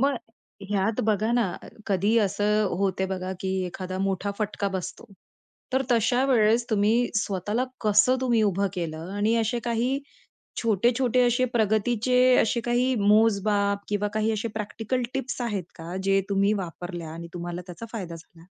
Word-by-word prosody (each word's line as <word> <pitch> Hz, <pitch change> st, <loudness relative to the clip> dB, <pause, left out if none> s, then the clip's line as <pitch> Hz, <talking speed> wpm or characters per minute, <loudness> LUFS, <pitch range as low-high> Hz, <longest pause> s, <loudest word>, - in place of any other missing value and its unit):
म 275 Hz, +1 st, +3 dB, 0.6 s
ह्यात 205 Hz, +2 st, +1 dB
बघा 215 Hz, +1 st, +1 dB
ना 240 Hz, -1 st, +3 dB, 0.2 s
अ, -, -, -11 dB, 0.2 s
कधी 200 Hz, +3 st, +2 dB
असं 210 Hz, +1 st, +1 dB
होते 190 Hz, -1 st, 0 dB
बघा, 185 Hz, 0 st, -3 dB
की 190 Hz, -, -2 dB, 0.2 s
एखादा 185 Hz, +1 st, -5 dB
मोठा 195 Hz, +1 st, -1 dB
फटका 210 Hz, -1 st, -1 dB
बसतो. 185 Hz, -2 st, -5 dB, 0.7 s
तर 265 Hz, +1 st, +2 dB
तशा 245 Hz, +2 st, +3 dB
वेळेस 235 Hz, -2 st, +3 dB
तुम्ही 210 Hz, +1 st, +3 dB, 0.2 s
स्वतःला 210 Hz, +3 st, -1 dB, 0.2 s
कसं 215 Hz, +4 st, +4 dB
तुम्ही 240 Hz, -4 st, +2 dB
उभं 200 Hz, -1 st, +1 dB
केलं 165 Hz, -1 st, -4 dB
आणि 215 Hz, +3 st, +2 dB
असे 225 Hz, +1 st, 0 dB
काही 240 Hz, +3 st, 0 dB, 0.6 s
छोटे-छोटे 240 Hz, +3 st, +2 dB
असे 245 Hz, +1 st, +2 dB
प्रगतीचे 225 Hz, +3 st, +2 dB, 0.2 s
असे 235 Hz, +2 st, +2 dB
काही 245 Hz, +2 st, +1 dB
मोजमाप 205 Hz, -1 st, +3 dB
किंवा 205 Hz, 0 st, 0 dB
काही 215 Hz, +1 st, +1 dB
असे 220 Hz, +1 st, -2 dB
प्रॅक्टिकल 225 Hz, +4 st, -2 dB
टिप्स 270 Hz, -1 st, -3 dB
आहेत 210 Hz, -6 st, -2 dB
का 170 Hz, +2 st, -7 dB
जे 195 Hz, 0 st, +3 dB
तुम्ही 200 Hz, +1 st, +3 dB
वापरल्या 175 Hz, -3 st, -5 dB
आणि 170 Hz, +1 st, -8 dB
तुम्हाला 175 Hz, 0 st, -5 dB
त्याचा 180 Hz, +5 st, -8 dB
फायदा 185 Hz, -7 st, -5 dB
झाला. 165 Hz, 0 st, -17 dB
210 Hz, 150 wpm, -26 LUFS, 190-230 Hz, 0.7 s, कसं